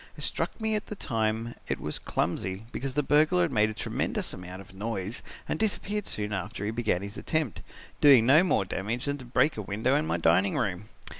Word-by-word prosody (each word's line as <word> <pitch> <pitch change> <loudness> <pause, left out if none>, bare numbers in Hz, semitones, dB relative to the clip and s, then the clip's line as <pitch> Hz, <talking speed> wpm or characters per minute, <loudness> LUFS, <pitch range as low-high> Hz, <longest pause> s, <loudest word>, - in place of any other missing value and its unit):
It - - -3
struck - - -1
me 220 -1 0
at 210 0 -2
the 210 - -5
time 115 - -1
it - - -1
was 75 - -4
clumsy, 95 +5 -2
because 135 0 -4
the 150 - +2
burglar 155 +5 +4
made 110 -5 +3
a - - -4
tremendous - - -2
amount 90 0 -8
of 95 -1 -13
noise 100 +1 -4 0.3
and - - -2
disappeared 210 -1 0
soon 105 0 -2
after 100 +2 -4
he 105 - -1
began 110 -5 0
his 100 +2 -6
attempt, 155 - -1 0.4
doing 135 -6 +8
no 145 +7 +7
more 135 - +2
damage 110 +7 -3
than 145 0 -2
to 130 - -9
break 135 +4 +2
a - - -2
window 110 +7 0
in 150 +2 +1
my - - +1
dining 85 +4 +3
room. 105 -6 -1
115 Hz, 210 wpm, -28 LUFS, 100-145 Hz, 0.4 s, doing